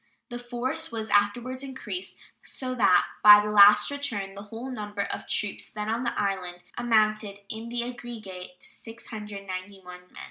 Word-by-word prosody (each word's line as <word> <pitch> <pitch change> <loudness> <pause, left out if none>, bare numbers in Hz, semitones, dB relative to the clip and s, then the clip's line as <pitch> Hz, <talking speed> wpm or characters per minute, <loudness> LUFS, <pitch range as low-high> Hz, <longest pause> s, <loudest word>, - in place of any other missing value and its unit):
The 240 -1 -6
force 245 +6 -2
was 220 -2 -4
afterwards 240 +6 +1
increased, 275 +7 -6 0.2
so 255 -1 -4
that 205 -7 +4 0.2
by 210 0 +10
the 210 0 -1
last 210 +3 +7
return 230 -9 -3
the 200 - -9
whole 225 +5 -7
number 210 -4 -4
of - - -5
troops 210 - -2
then 210 0 -5
on 235 +3 -1
the 235 - -1
island 185 -3 -2
amounted 215 -3 +1
in 225 +1 -6
the 240 0 -2
aggregate 215 -7 -8
to - - -6
691 200 -5 -8
men. - - -23
215 Hz, 155 wpm, -27 LUFS, 200-240 Hz, 0.2 s, by